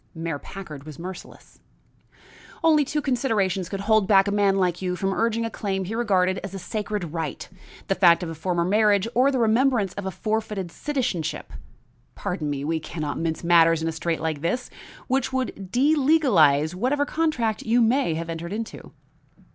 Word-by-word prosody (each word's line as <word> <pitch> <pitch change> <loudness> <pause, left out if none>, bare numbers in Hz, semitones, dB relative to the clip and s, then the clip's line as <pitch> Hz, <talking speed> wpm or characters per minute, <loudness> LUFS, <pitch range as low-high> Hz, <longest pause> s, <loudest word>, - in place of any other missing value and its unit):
Mayor 165 -2 -4
Packard 155 -7 -9
was 150 -2 -10
merciless. 185 +2 -10 1.0
"Only 310 -2 +5
two 300 +2 -2
considerations 210 - 0
could 195 -1 -4
hold 215 -1 +3
back 195 -1 +5
a - - 0
man 200 -1 +2
like 180 -2 0
you 180 -1 -1
from 195 +1 -1
urging 230 +2 0
a - - -2
claim 195 -3 -3
he 205 - -5
regarded 190 -5 +1
as 195 0 -7
a - - -3
sacred 200 -2 -4
right; 160 -3 -4 0.4
the - - +2
fact 175 -3 +5
of 170 - -4
a - - -5
former 170 +2 -1
marriage 205 +1 +3
or 255 +3 +4
the 270 - 0
remembrance 230 -3 +2
of 200 -1 -5
a - - 0
forfeited 210 -2 -3
citizenship 240 - -3 0.6
pardon 180 -6 -3
me, 140 -1 -3
we 160 +1 0
can 155 0 -6
not 145 -1 -3
mince 165 0 -2
matters 165 -1 +4
in - - -1
a - - 0
strait 165 +1 -2
like 155 -3 -2
this 210 +10 -2 0.3
which 265 0 0
would 255 -7 -3
delegalize 255 - +3
whatever 260 +9 0
contract 285 -10 -1
you 230 +2 +2
may 235 - +2
have 165 +1 -4
entered 165 +1 -5
into." 225 +1 -7
195 Hz, 180 wpm, -24 LUFS, 170-230 Hz, 1.0 s, Only